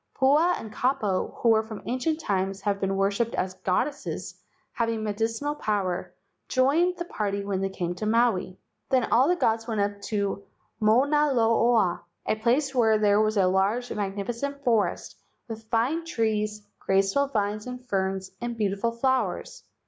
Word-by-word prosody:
Pua 300 +6 +4
and 220 -1 -9
Kapo, 215 -7 0
who 225 -2 +5
from 220 -2 -9
ancient 285 +6 -1
times 195 -7 -1
have 200 -1 -1
been 195 0 0
worshipped 200 +4 0
as 185 0 -1
goddesses 195 +10 -2 0.4
having 230 -2 -1
medicinal 225 +7 -1
power, 195 -9 -2 0.3
joined 315 +8 +2
the 345 - -4
party 200 -8 -3
when 195 -1 -1
they 195 - 0
came 175 -2 -3
to 195 +4 -4
Maui. 220 -5 +1 0.3
Then 260 -2 +3
all 255 +4 +5
the 355 - +3
gods 225 -8 0
went 220 -3 -2
up 200 0 -1 0.8
Mauna 280 +7 +3
Loa, 230 -5 +3 0.2
a - - +1
place 255 +5 +1
where 225 -4 +4
there 210 0 +3
was 215 0 +1
a 190 - +4
large 195 +7 +1
and - - -4
magnificent 235 +8 -3
forest 225 -5 0 0.3
with 225 -1 -8
fine 250 +9 +1
trees, 215 -8 -1
graceful 195 +9 +2
vines 210 -3 -2
and 250 0 -7
ferns, 190 -2 -1
and 240 -1 -4
beautiful 205 +2 0
flowers. 260 +2 -1
220 Hz, 155 wpm, -26 LUFS, 200-250 Hz, 0.8 s, who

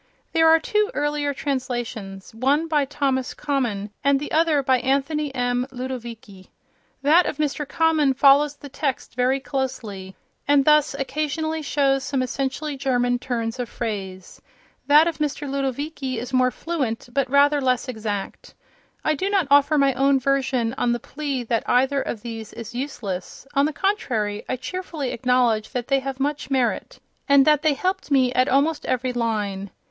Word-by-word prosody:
There 325 0 +4
are 325 0 +6
two 425 +5 +1
earlier 295 0 0
translations, 240 -7 -4
one 275 +8 +1
by 300 -3 +2
Thomas 270 -2 -1
Common 240 -9 -2
and 280 0 +3
the 295 - -6
other 315 -3 +3
by 260 -1 +3
Anthony 280 +3 0
M. 245 0 0
Ludovici. 235 -6 -7 0.6
That 320 +5 +5
of - - -3
Mr. 295 -1 -2
Common 310 -4 +2
follows 285 +2 +5
the 285 - -11
text 275 -1 -3
very 250 +2 +1
closely, 240 -9 -4 0.3
and 285 -1 +4
thus 300 -2 +4
occasionally 310 +3 -2
shows 275 -2 +1
some 265 -1 -1
essentially 275 +3 -3
German 245 -2 +1
turns 235 -1 -3
of 245 - -3
phrase; 190 -5 -6 0.5
that 300 +2 +7
of 330 -2 -3
Mr. 295 -1 -2
Ludovici 275 0 -3
is 245 +3 -6
more 255 0 +4
fluent 260 -7 -3
but 275 -2 0
rather 285 +1 +4
less 255 -1 +1
exact. 215 -5 -5 0.5
I 310 - +2
do 375 +6 -2
not 390 -4 +2
offer 285 +2 +5
my 275 -1 +3
own 270 +2 +3
version 260 -3 0
on 240 - +2
the 240 - -2
plea 280 -1 -4
that 230 0 -2
either 265 +3 +3
of 220 -5 -5
these 225 -2 -7
is 230 0 -8
useless; 240 -9 -5
on 280 0 +3
the - - -2
contrary, 235 - -1
I - - 0
cheerfully 305 0 -5
acknowledge 240 -3 +1
that 245 -1 -3
they 275 -1 +3
have 270 0 -5
much 285 0 -2
merit, 260 -3 -1 0.3
and 280 -1 +6
that 300 -1 +4
they 310 -2 +2
helped 370 +4 -2
me 260 -3 +3
at 255 +3 +2
almost 290 +3 +1
every 255 0 -1
line. 210 -5 -2
270 Hz, 165 wpm, -23 LUFS, 245-290 Hz, 0.6 s, that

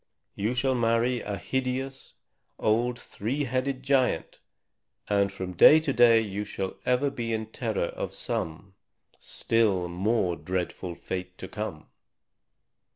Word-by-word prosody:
You 110 +5 -1
shall 130 +1 +2
marry 120 +1 +2
a 100 -1 -4
hideous 130 +2 -3 0.4
old 120 +3 +1
three 125 +9 -3
headed 130 +1 -2
giant, 130 - +1 0.7
and 100 -1 +2
from 95 -2 -5
day 150 - +8
to 155 -3 -1
day 120 -2 +6
you 105 -1 -3
shall 95 -2 -4
ever 125 +3 +2
be 115 -3 -3
in 110 -1 -1
terror 110 -8 -1
of - - -5
some 80 +5 -4 0.5
still 105 -6 +1
more 90 +1 0
dreadful 90 +2 -4
fate 90 +1 -6
to 95 - -7
come!" 105 -8 -5
115 Hz, 130 wpm, -27 LUFS, 95-125 Hz, 0.7 s, day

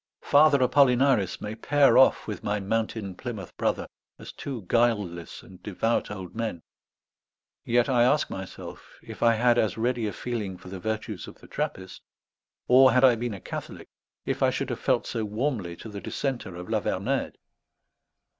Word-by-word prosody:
Father 145 0 +5
Apollinaris 125 -7 +3
may 105 0 -4
pair 140 +5 +3
off 130 - +5
with 105 - -5
my 105 0 -1
mountain 110 -1 -2
Plymouth 105 -2 -7
Brother - - -1 0.3
as - - -10
two 130 -7 -6
guileless 100 -6 0
and 90 -1 -15
devout 110 +4 -1
old 95 -4 -7
men; 110 -8 -4 1.0
yet 120 0 +2
I 125 -3 +3
ask 135 +5 +3
myself 95 -1 -9
if - - -10
I 115 -1 +5
had 120 +1 +3
as 110 0 0
ready 120 -1 0
a - - -2
feeling 105 -5 -4
for 90 - -12
the 95 0 -7
virtues 110 -2 -4
of - - -11
the - - -17
Trappist; 95 0 -5 0.7
or, 130 +1 +7
had 125 +1 +4
I 130 -2 +7
been 115 -2 -3
a - - -9
Catholic, - - -8 0.4
if - - -2
I - - +5
should - - -3
have - - -4
felt - - +1
so 115 - -3
warmly 105 -4 -2
to 110 - -10
the 100 -2 -7
dissenter 130 -10 -4
of 90 +1 -8
La 110 -1 0
Vernède. 120 +10 -2
110 Hz, 175 wpm, -26 LUFS, 95-125 Hz, 1.0 s, or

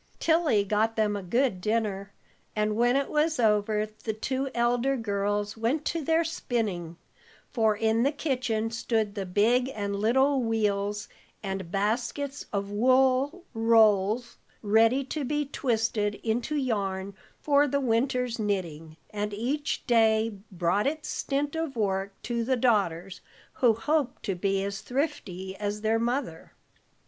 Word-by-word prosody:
Tilly 320 -10 +3
got 215 +3 0
them 215 -2 +1
a 200 - -3
good 235 +1 0
dinner, 205 -2 -1 0.4
and 210 0 0
when 240 +3 +3
it 275 0 +1
was 305 -1 +1
over 210 -1 +2 0.2
the 220 - -1
two 265 +5 -2
elder 245 +3 +1
girls 205 -1 -1
went 245 +7 -1
to 330 -2 -1
their 325 +3 +2
spinning, 205 - -3 0.5
for 220 -4 +2
in 220 +1 +1
the 275 +4 +3
kitchen 250 -7 -1
stood 225 -2 -1
the 195 -2 -4
big 235 +7 +2
and 200 -1 -2
little 265 +6 +2
wheels, 210 -2 -1 0.4
and 190 -3 -4
baskets 235 +8 -2
of 200 -1 -2
wool 260 - +2
rolls, 225 0 +3 0.3
ready 225 +5 +4
to 285 +2 -4
be 295 +2 -1
twisted 225 -6 -1
into 235 +6 -1
yarn 200 -7 -2 0.3
for 290 0 +3
the 280 +1 0
winter's 250 -1 0
knitting, 165 -7 -3
and 210 0 -3
each 270 +7 -2
day 225 -2 +3 0.2
brought 180 +5 +1
its 305 +1 -3
stint 285 +2 -2
of 320 -4 -3
work 195 -2 -2
to 235 -1 -1
the 260 +2 +1
daughters, 195 -6 0 0.3
who 235 -4 +3
hoped 285 +2 -1
to 195 - -1
be 195 +2 0
as 200 0 -4
thrifty 215 - -3
as 205 0 -3
their 220 +1 +1
mother. 235 - -3
225 Hz, 140 wpm, -27 LUFS, 205-260 Hz, 0.5 s, ready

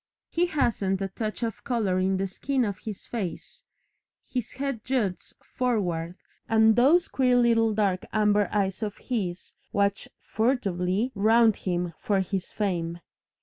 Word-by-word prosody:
He 350 +1 +2
hasn't 215 - 0
a 195 - -2
touch 215 +4 -4
of 225 -3 -3
colour 215 -8 0
in 190 +1 +1
the 195 - 0
skin 255 +7 -1
of 200 -3 -4
his 210 -3 -7
face, 225 - -5 0.6
his 250 -3 -4
head 270 -5 -3
juts 230 -8 -2
forward, 180 -9 -1 0.3
and 220 -1 +5
those 290 +9 +5
queer 255 -2 +2
little 230 -2 +4
dark 195 -3 0
amber 210 -1 +2
eyes 195 0 0
of 210 -2 -3
his 190 -8 -4 0.2
watch 200 0 0
furtively 215 -2 0
round 220 +1 +4
him 175 -2 -2
for 200 -2 +1
his 190 -1 -3
fame. 175 -5 -2
210 Hz, 145 wpm, -26 LUFS, 190-240 Hz, 0.6 s, and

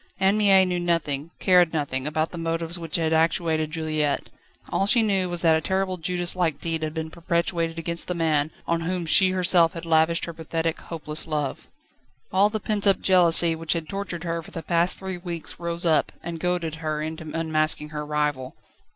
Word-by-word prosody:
Anne 190 +1 +3
Mie 195 -3 +5
knew 180 -1 -1
nothing, 165 -4 -1
cared 180 -3 +4
nothing, 145 -3 -2
about 155 +1 -1
the 175 - -8
motives 165 +1 -2
which 165 -2 -3
had 160 -1 +1
actuated 160 -1 +1
Juliette; 155 -2 -2 0.4
all 195 - 0
she 230 +2 +5
knew 195 -4 0
was 175 0 -4
that 165 -1 +5
a 160 - 0
terrible 190 +2 -1
Judas 175 +1 0
like 170 -5 0
deed 165 -1 -3
had 155 0 -4
been 160 0 -4
perpetrated 170 -1 -2
against 170 +1 -2
the 180 - -2
man, 155 -3 +1 0.2
on 170 0 -1
whom 175 +1 -2
she 185 +3 +5
herself 180 -2 +3
had 165 0 -7
lavished 160 0 +2
her 170 - -7
pathetic, 165 0 -3
hopeless 155 -1 -5
love. 150 -3 -3 0.7
All 195 +2 +4
the 215 0 -3
pent 210 0 -1
up 195 - +4
jealousy 170 -2 +6
which 160 0 -1
had 165 -2 -4
tortured 195 -3 -5
her 165 -1 -3
for - - -14
the 165 - -7
past 170 +1 +1
three 190 -2 -6
weeks 170 -3 -6
rose 170 0 -4
up, 160 -2 +2
and 170 -1 -6
goaded 175 -2 -1
her 155 -1 -2
into 160 0 -6
unmasking 155 -2 0
her 150 0 -5
rival. 150 -3 -2
165 Hz, 195 wpm, -24 LUFS, 160-180 Hz, 0.7 s, jealousy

